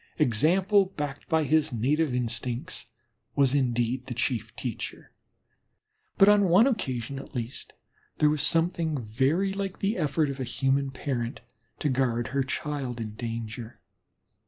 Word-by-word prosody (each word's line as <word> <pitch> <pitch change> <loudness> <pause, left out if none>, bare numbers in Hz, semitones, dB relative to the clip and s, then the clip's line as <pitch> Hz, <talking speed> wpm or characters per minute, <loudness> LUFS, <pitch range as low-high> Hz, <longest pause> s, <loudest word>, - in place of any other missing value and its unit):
Example 185 - +3
backed 145 -2 -4
by 160 -1 +3
his 155 +1 +2
native 140 +6 +1
instincts 125 0 -2 0.5
was 140 -2 +4
indeed 125 -1 0
the 125 - -4
chief 115 -2 -1
teacher, 120 -5 -5 1.1
but 195 - +7
on 205 -1 +6
one 190 +7 +7
occasion 135 - -1
at 135 - -11
least 120 +1 -5 0.4
there 150 -1 +4
was 150 -2 0
something 165 0 +1
very 135 - +1
like 195 -1 -3
the 200 +2 0
effort 150 -2 +1
of 135 - -8
a - - -1
human 135 +2 +1
parent 130 -3 -3 0.4
to - - -1
guard 125 -3 +1
her 140 0 0
child 135 -2 -3
in 110 -2 -4
danger. 115 0 -6
135 Hz, 140 wpm, -27 LUFS, 120-160 Hz, 1.1 s, but